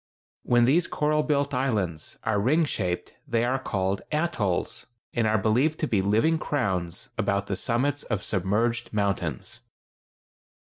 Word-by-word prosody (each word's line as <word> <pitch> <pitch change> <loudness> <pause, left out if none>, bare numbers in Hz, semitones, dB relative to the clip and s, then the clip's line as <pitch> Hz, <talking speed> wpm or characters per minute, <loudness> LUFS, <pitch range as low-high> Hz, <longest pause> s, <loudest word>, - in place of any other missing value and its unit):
When 120 -1 +4
these 160 +7 +3
coral 150 0 +1
built 145 -2 0
islands 105 - -1
are 110 -2 +1
ring 150 +10 +3
shaped 90 -10 -2
they 115 0 +1
are 130 +2 +1
called 95 -5 -1
atolls, 150 - -1 0.3
and 115 -2 +1
are 110 0 +3
believed 125 +10 +2
to 155 - +1
be 105 -7 +2
living 115 +12 +2
crowns 95 - -2
about 100 0 +1
the 100 - -2
summits 130 +8 0
of 105 -4 -2
submerged 110 +5 0
mountains. 100 - -1
115 Hz, 140 wpm, -26 LUFS, 100-140 Hz, 0.3 s, When